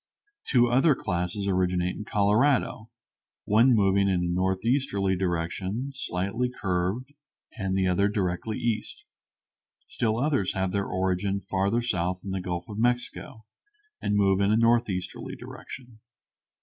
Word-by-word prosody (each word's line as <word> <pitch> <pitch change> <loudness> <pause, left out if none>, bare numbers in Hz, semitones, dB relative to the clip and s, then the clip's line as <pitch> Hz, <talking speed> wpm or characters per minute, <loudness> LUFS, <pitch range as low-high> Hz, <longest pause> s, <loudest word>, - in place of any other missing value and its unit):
Two 120 -3 +4
other 135 +5 +4
classes 90 +1 -2
originate 90 -1 +1
in 105 - -7
Colorado, 110 +2 +2 0.6
one 115 +4 +5
moving 100 -1 +3
in 90 -2 +1
a - - 0
northeasterly 95 +2 +1
direction 95 +7 -2
slightly 115 0 -2
curved, 100 +4 -2 0.4
and 95 -4 -2
the 95 - +2
other 95 +2 +2
directly 100 +1 -2
east. 115 -2 -3 0.8
Still 115 -2 -1
others 140 -9 0
have 95 -1 0
their 100 0 -1
origin 95 +1 0
farther 100 +4 0
south 90 -5 -1
in 100 - -5
the 95 -1 -2
Gulf 90 -1 -4
of 105 0 -6
Mexico, 120 0 -1 0.6
and 105 - 0
move 100 -1 +3
in 100 - +3
a 110 - +4
northeasterly 115 -5 0
direction. 120 -4 -10
100 Hz, 135 wpm, -27 LUFS, 95-115 Hz, 0.8 s, one